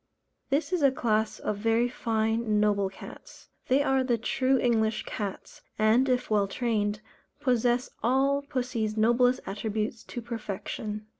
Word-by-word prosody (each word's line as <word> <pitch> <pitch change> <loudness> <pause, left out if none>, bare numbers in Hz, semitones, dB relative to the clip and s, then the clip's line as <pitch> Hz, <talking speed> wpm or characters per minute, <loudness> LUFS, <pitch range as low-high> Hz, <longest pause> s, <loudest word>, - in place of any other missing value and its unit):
This 290 +6 0
is 360 - +1
a 280 - +6
class 220 -4 0
of 210 - -3
very 225 +3 +2
fine, 225 -2 0
noble 205 -2 +2
cats. 195 - -13 0.2
They 270 +3 +3
are 270 -2 +2
the 245 -2 +1
true 260 +3 +1
English 225 -3 +1
cats, 200 -3 -6 0.2
and, 225 +5 +3
if 250 -1 +1
well 205 -2 +3
trained, 210 -1 -1 0.4
possess 245 -2 +1
all 270 +4 +2
pussy's 245 -6 -2
noblest 240 +3 +3
attributes 215 +2 -3
to - - -6
perfection. 215 -2 -5
230 Hz, 140 wpm, -28 LUFS, 215-255 Hz, 0.4 s, a